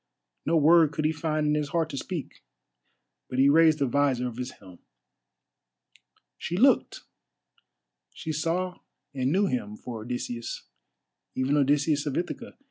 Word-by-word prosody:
No 165 +1 +3
word 160 0 +5
could 155 +1 -2
he 155 - +3
find 155 -1 -1
in 150 - +2
his 150 -1 -1
heart 165 0 -1
to 140 - -5
speak, 170 0 -6 0.9
but 125 - -4
he 135 +1 +5
raised 160 +1 +5
the 140 - +1
visor 130 -1 +1
of 120 -1 -7
his 125 0 -4
helm. 90 -2 -16 1.6
She 175 - -3
looked—she 230 -8 -3
saw 170 +4 -2 0.3
and 130 0 0
knew 195 +4 +3
him 115 - -2
for 115 0 -7
Odysseus—even 120 - -5
Odysseus 145 +1 +2
of 140 - -2
Ithaca. 180 +7 -5
145 Hz, 135 wpm, -27 LUFS, 125-160 Hz, 1.6 s, word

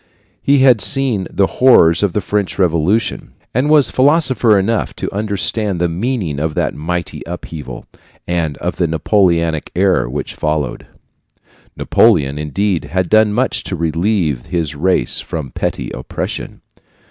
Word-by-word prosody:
He 140 +1 +3
had 125 -5 +5
seen 125 -8 +1
the 100 - +1
horrors 95 -9 +4
of 100 -4 0
the 105 - 0
French 100 0 -2
Revolution, 95 +4 0 0.2
and 130 +5 +1
was 150 -5 +4
philosopher 130 -6 +3
enough 105 +3 -1
to - - -5
understand 100 -1 -1
the 90 - +1
meaning 90 - -2
of 75 0 -2
that - - 0
mighty 85 +3 -4
upheaval, 80 -7 -8 0.4
and 85 -5 -1
of - - -4
the 85 - +1
Napoleonic 85 -2 +1
era 95 -7 +2
which 70 +4 -5
followed. 75 -4 -3 0.9
Napoleon, 70 +1 +2
indeed, 85 +5 -1
had 90 -1 -2
done 110 -1 +4
much 125 +5 0
to 95 - -4
relieve 85 - -1
his 85 -4 -2
race 90 +6 +1
from 75 -6 -6
petty - - -3
oppression. 65 - -6
90 Hz, 140 wpm, -16 LUFS, 80-105 Hz, 0.9 s, had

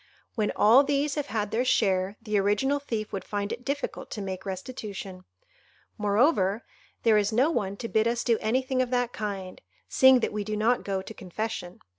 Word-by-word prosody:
When 215 -3 0
all 235 +7 +6
these 285 0 0
have 295 -1 -3
had 210 -1 -2
their 235 +3 +1
share, 195 -5 +1
the 215 -2 -2
original 210 +9 +1
thief 225 -6 -4
would 195 - -3
find 205 0 -3
it 245 - -5
difficult 280 +2 -4
to - - -6
make 190 0 -5
restitution. 195 -2 -6 0.7
Moreover, 210 - +2 0.4
there 220 -2 +5
is 205 +1 0
no 255 +8 +3
one 200 -9 -2
to 230 - -5
bid 220 0 +2
us 235 0 0
do 230 -3 +2
anything 255 +3 0
of 255 - -1
that 245 -1 0
kind, 195 -3 -5 0.3
seeing 260 -2 +6
that - - -1
we 210 -1 -2
do 215 +1 -3
not 235 +4 +2
go 195 -1 -2
to 220 - -9
confession. 190 -1 -5
215 Hz, 190 wpm, -27 LUFS, 200-250 Hz, 0.7 s, all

